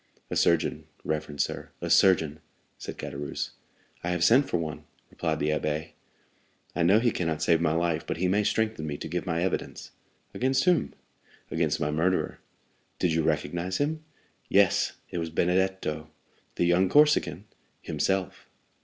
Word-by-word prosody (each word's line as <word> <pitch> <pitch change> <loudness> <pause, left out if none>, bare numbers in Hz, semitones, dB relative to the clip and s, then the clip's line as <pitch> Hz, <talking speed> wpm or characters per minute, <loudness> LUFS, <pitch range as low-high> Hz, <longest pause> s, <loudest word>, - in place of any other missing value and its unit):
"A - - -1
surgeon, 85 -2 +2 0.2
reverend 75 -2 -2
sir—a - - -4
surgeon!" 80 -5 +4 0.4
said - - -7
Caderousse. 70 +1 -5 0.5
"I 85 - -1
have 90 -1 0
sent 135 +7 +5
for - - +1
one," 80 -2 -5 0.3
replied - - -1
the 75 - 0
abbé. 75 +1 -1 0.8
"I 85 - 0
know 90 +5 +5
he 120 0 +2
cannot 80 -4 -2
save 85 0 +3
my 80 -2 +2
life, 85 -1 0
but - - -2
he 90 +2 +1
may 100 +3 +2
strengthen 110 -7 0
me 70 -1 -3
to - - -6
give 90 +3 -3
my 85 0 0
evidence." 95 - -3 0.4
"Against 130 +1 +1
whom?" 180 -3 +2 0.6
"Against 80 -2 0
my 75 - 0
murderer." 85 +5 0 0.6
"Did 85 - +1
you 80 - +2
recognize 85 +4 -1
him?" 155 +2 -1 0.5
"Yes; - - +3 0.2
it 85 - -2
was 80 0 -3
Benedetto." 90 -3 0 0.5
"The 85 - +1
young 90 +2 +3
Corsican?" 150 +4 +3 0.4
"Himself." 95 -2 -2
85 Hz, 155 wpm, -27 LUFS, 80-95 Hz, 0.8 s, sent